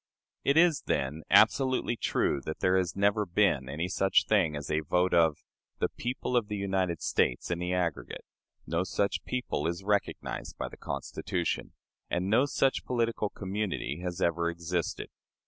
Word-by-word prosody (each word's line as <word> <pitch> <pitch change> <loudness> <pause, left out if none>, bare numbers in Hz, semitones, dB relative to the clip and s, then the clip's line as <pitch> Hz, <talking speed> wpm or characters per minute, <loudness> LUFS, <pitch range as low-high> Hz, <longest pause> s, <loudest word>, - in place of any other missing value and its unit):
It 140 +2 +3
is, 170 -3 +5
then, 70 +4 -1
absolutely 130 -2 +4
true 70 -9 0
that 80 - -3
there 95 0 +3
has 90 -2 0
never 100 +2 +2
been 85 -8 +1
any 80 +5 -2
such 95 +1 +2
thing 95 -8 +2
as 75 0 -5
a 75 - +2
vote 90 +4 +1
of 80 -3 +4 0.4
"the - - 0
people 125 +1 -3
of 120 -4 +2
the 105 -1 -3
United 95 -4 -1
States - - +1
in 85 - -1
the 90 0 -2
aggregate"; 90 -3 -2 0.4
no 85 +2 0
such 100 +2 -1
people 125 -11 -2
is 85 +3 -3
recognized 100 0 -2
by - - -3
the - - -12
Constitution; 75 +5 -3 0.4
and 90 +3 -1
no 125 +6 +4
such 135 -1 +1
political 115 -3 0
community 95 -8 -3
has 90 0 -4
ever 85 -1 +1
existed. 85 0 -3
90 Hz, 165 wpm, -29 LUFS, 85-105 Hz, 0.4 s, is